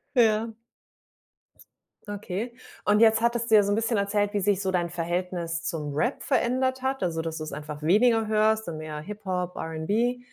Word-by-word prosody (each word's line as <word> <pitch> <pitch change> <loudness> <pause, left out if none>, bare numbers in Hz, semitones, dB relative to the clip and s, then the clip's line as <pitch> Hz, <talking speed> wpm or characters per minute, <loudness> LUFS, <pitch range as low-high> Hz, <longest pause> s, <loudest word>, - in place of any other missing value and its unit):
Ja. 225 -1 +3 1.5
Okay. 205 +3 -4 0.3
Und 210 +1 +3
jetzt 225 0 +5
hattest 235 0 +1
du - - +8
ja 205 - +7
so 200 - 0
'n - - +3
bisschen 225 0 0
erzählt, 205 +1 0
wie 205 - +1
sich 200 0 +1
so 190 - -1
dein 175 -2 0
Verhältnis 170 0 -3
zum 150 -5 -3
Rap 240 - 0
verändert 260 0 +1
hat, 265 0 -1
also, 165 -2 -1
dass 160 0 -4
du's 155 0 -5
einfach 150 +1 -7
weniger 220 +6 +3
hörst 220 0 +2
und 160 -2 -4
mehr 155 -1 -6
Hip 210 +5 -9
Hop, 180 -1 -2
R'n'B, 210 +10 -1
205 Hz, 180 wpm, -26 LUFS, 170-225 Hz, 1.5 s, du